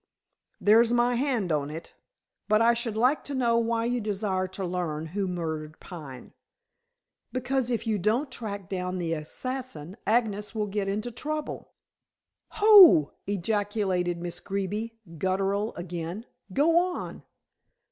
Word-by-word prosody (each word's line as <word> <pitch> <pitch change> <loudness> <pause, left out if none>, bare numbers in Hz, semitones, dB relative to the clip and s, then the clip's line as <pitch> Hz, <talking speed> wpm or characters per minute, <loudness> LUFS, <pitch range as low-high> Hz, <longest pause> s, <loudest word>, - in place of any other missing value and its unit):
"There's 225 +3 +5
my 240 0 +3
hand 240 - 0
on 145 -2 0
it. 160 +2 -8 0.6
But 215 0 +5
I 230 +1 +5
should 235 -2 -3
like 255 +6 +2
to 285 - -4
know 235 -3 +2
why 230 0 0
you 245 0 0
desire 200 -3 -1
to 190 +1 -5
learn 170 -4 -3
who 190 +4 -2
murdered 160 -3 -4
Pine." 145 -8 -10 1.0
"Because 255 0 -1
if 235 -1 -1
you 215 -2 0
don't 235 - +1
track 205 -6 -5
down 180 0 -3
the 170 -2 -1
assassin, 185 - -5
Agnes 215 -2 +1
will 215 -1 0
get 200 -1 -2
into 210 +5 -2
trouble." 305 +5 -5 0.8
"Ho!" 395 - +8 0.2
ejaculated 200 -3 0
Miss 175 0 -3
Greeby, 205 +4 -3 0.2
guttural 195 +4 0
again. 175 +4 -5 0.3
"Go 325 - +4
on." 360 0 -3
205 Hz, 135 wpm, -27 LUFS, 180-235 Hz, 1.0 s, Ho